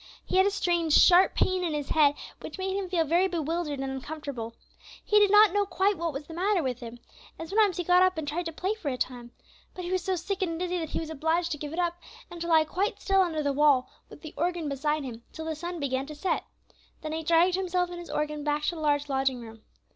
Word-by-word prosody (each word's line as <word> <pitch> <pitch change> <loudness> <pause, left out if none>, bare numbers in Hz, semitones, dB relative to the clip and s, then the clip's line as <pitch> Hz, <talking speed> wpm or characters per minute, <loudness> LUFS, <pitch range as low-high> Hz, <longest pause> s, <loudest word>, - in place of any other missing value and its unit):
He - - 0
had 380 +1 +5
a - - +4
strange, 345 -5 0
sharp 360 +4 +6
pain 370 -1 +1
in 325 -3 -1
his 290 -2 -4
head, 290 -2 +4 0.2
which - - -8
made 380 0 -2
him 390 -2 -3
feel 345 -3 +2
very 345 +5 +3
bewildered 330 -3 -2
and 270 0 -3
uncomfortable. 265 -4 -6 0.5
He 420 - +4
did 410 -1 +5
not 415 -1 +6
know 410 -1 +1
what 360 -2 0
was 285 +1 -6
the 325 - -10
matter 370 +1 +1
with 250 -2 -2
him, 235 -1 -8 0.4
and 325 - -7
sometimes 405 0 +2
he 355 - -1
got 360 +1 +4
up 370 -2 +3
and 310 -2 -4
tried 335 +4 -2
to - - -4
play 370 +6 -2
for 435 -8 -8
a 275 - 0
little 250 - 0
time, 240 -2 -11 0.4
but 365 - -6
he 350 - -4
was 370 -1 0
so 375 +1 0
sick 385 +3 -4
and 330 -3 -1
dizzy 360 0 -1
that 320 -2 -4
he - - -2
was 320 -1 -5
obliged 320 +3 0
to 300 - -3
give 295 -1 -5
it 325 - -6
up, 345 -1 -1 0.3
and 345 -1 -8
to 340 - -3
lie 320 -2 +5
quite 385 +6 -2
still 390 -1 +3
under 320 -4 0
the 285 -1 0
wall, 280 -3 +3 0.2
with - - -14
the 315 - -8
organ 345 -2 -1
beside 295 +2 -1
him, 235 -3 -7
till 320 - -7
the 320 - -2
sun 345 +3 -6
began 270 -1 -2
to 300 - -8
set. 365 +6 -1 0.6
Then 310 - -4
he 320 +1 -2
dragged 335 +3 +3
himself 360 -1 0
and 350 - -6
his 345 - -10
organ 300 0 -2
back 295 0 -1
to - - +2
the 320 - -7
large 290 -1 +1
lodging 270 -2 0
room. 225 -2 -11
330 Hz, 260 wpm, -27 LUFS, 290-360 Hz, 0.6 s, sharp